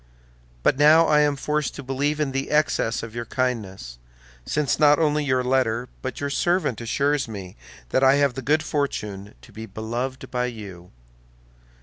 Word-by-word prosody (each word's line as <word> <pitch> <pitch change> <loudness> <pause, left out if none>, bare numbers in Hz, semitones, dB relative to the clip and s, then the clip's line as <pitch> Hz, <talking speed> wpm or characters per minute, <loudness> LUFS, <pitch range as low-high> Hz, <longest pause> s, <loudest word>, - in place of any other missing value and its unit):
But 135 - +2
now 155 +3 +7
I 150 -2 +4
am 145 -1 +3
forced 150 +2 -2
to 140 - -7
believe 140 +3 -1
in 150 -3 0
the 135 +1 -3
excess 150 -6 +1
of 115 -1 -8
your 120 0 -4
kindness, 100 - -3 0.5
since 150 -3 0
not 150 -1 +6
only 150 -2 +1
your 130 -2 +1
letter 125 -2 0
but 130 - -5
your 145 0 -2
servant 175 - 0
assures 140 +4 0
me 100 -5 -8 0.3
that 130 - +1
I 135 +1 +6
have 140 -2 +2
the 135 - -5
good 155 +3 +1
fortune 105 -9 -3
to - - -15
be 110 +1 -8
beloved 120 +5 -5
by 125 -1 0
you. 100 -7 -9
130 Hz, 175 wpm, -24 LUFS, 115-145 Hz, 0.5 s, now